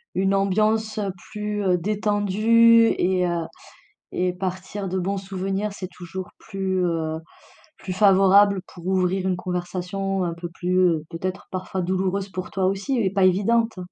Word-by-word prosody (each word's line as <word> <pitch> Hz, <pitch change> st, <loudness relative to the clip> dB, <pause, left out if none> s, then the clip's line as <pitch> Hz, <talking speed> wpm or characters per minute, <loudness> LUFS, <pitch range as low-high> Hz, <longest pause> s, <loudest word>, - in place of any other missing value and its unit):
une 195 Hz, +1 st, +2 dB
ambiance 215 Hz, +2 st, +1 dB, 0.3 s
plus, 210 Hz, -1 st, -3 dB
heu, 180 Hz, -2 st, +3 dB
détendue 215 Hz, +4 st, +4 dB
et 180 Hz, 0 st, +1 dB
heu 170 Hz, -1 st, -1 dB, 0.7 s
et 180 Hz, 0 st, +1 dB
partir 185 Hz, +2 st, -4 dB
de 190 Hz, +1 st, -2 dB
bons 195 Hz, +2 st, -1 dB
souvenirs 195 Hz, +1 st, -3 dB
c'est 185 Hz, -3 st, -7 dB
toujours 180 Hz, +1 st, -8 dB
plus, 190 Hz, -2 st, -2 dB
heu, 160 Hz, -2 st, -1 dB, 0.6 s
plus 185 Hz, -, -5 dB
favorable 195 Hz, 0 st, +5 dB
pour 175 Hz, 0 st, -11 dB
ouvrir 190 Hz, 0 st, +1 dB
une 185 Hz, -, +1 dB
conversation 180 Hz, +2 st, -3 dB
un 170 Hz, -, -2 dB
peu 170 Hz, 0 st, -6 dB
plus, 180 Hz, +2 st, -1 dB
heu, 165 Hz, -4 st, +2 dB
peut-être 185 Hz, +3 st, -5 dB
parfois 185 Hz, 0 st, -3 dB
douloureuse 190 Hz, +2 st, -1 dB
pour 185 Hz, -1 st, -6 dB
toi 190 Hz, -1 st, +1 dB
aussi 195 Hz, +7 st, -1 dB
et 195 Hz, -4 st, +1 dB
pas 195 Hz, -2 st, +2 dB
évidente. 220 Hz, +4 st, +2 dB
190 Hz, 150 wpm, -23 LUFS, 180-200 Hz, 0.7 s, favorable